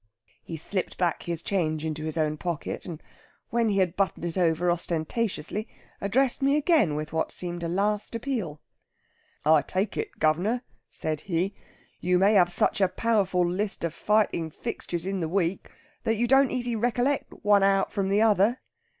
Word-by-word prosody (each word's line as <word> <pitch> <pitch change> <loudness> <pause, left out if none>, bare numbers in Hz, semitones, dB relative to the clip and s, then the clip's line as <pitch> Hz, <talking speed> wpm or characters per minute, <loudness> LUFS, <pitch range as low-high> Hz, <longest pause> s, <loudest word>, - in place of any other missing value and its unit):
He 165 - -7
slipped 185 +4 -2
back 175 -3 0
his 170 -1 -4
change 155 -5 -1
into 155 0 -3
his 160 0 -3
own 155 -1 +1
pocket, 170 -1 -4
and 165 -3 -7 0.5
when 235 -1 +2
he 200 - 0
had 185 -2 +1
buttoned 190 -3 -1
it 170 - -3
over 175 -1 +2
ostentatiously 175 +4 -2 0.3
addressed 250 +7 +2
me 275 +2 +3
again 300 - +3
with 155 +1 -4
what 160 - 0
seemed 175 -1 -3
a 170 - -2
last 205 +5 -1
appeal. 225 - -3 0.9
'I 155 -1 +6
take 195 +6 -2
it, - - -4
guv'nor,' 185 +11 +1 0.3
said 155 -1 -3
he, 185 +2 -1 0.5
'you 180 0 +2
may 195 +3 +4
have 180 -4 +5
such 200 - +1
a 190 - +5
powerful 190 -4 +1
list 195 +3 0
of 170 -2 -1
fighting 210 -6 +1
fixtures 170 +2 -5
in 195 0 -2
the 165 -2 -2
week 185 0 -1 0.3
that 225 0 +1
you 240 - +2
don't 270 +2 +5
easy 240 -2 -1
recollect 245 +4 0
one 205 -1 +5
out 195 0 +3
from 195 -2 0
the 205 +2 +3
other. 220 +3 +3
190 Hz, 175 wpm, -27 LUFS, 165-215 Hz, 0.9 s, I